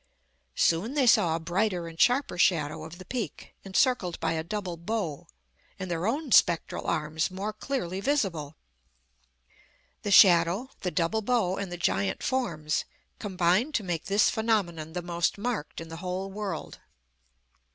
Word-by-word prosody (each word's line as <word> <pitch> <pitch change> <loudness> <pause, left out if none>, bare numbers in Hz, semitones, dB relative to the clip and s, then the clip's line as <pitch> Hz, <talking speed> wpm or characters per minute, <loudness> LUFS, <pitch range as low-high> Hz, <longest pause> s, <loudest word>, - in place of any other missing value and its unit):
Soon 195 - +1
they 280 -3 +3
saw 200 -8 +4
a - - -2
brighter 175 +1 -1
and 165 0 -5
sharper 255 -4 +3
shadow 155 -5 +2
of 160 +2 -9
the 185 - -11
Peak, 220 - -5
encircled 195 -2 +1
by - - 0
a 160 0 -2
double 185 0 -4
bow, 170 -3 -4 0.5
and 185 -2 -5
their 170 +3 -1
own 280 +3 -2
spectral 170 -6 +3
arms 155 +1 0
more 195 +3 -4
clearly 210 -6 -3
visible. 190 - -1 1.5
The - - -3
shadow, 185 +5 +6
the 180 - -2
double 180 +5 0
bow, 205 -5 +1
and 200 -2 -4
the 175 - -4
giant 100 - 0
forms, 165 -13 -1 0.4
combined 190 - +1
to 220 - +1
make 175 -4 -3
this 200 +1 +3
phenomenon 180 -8 -1
the 180 0 -4
most 170 +2 0
marked 215 -7 -3
in 165 0 -8
the 165 - -7
whole 185 +2 -4
world. 195 -5 -5
185 Hz, 150 wpm, -28 LUFS, 165-215 Hz, 1.5 s, shadow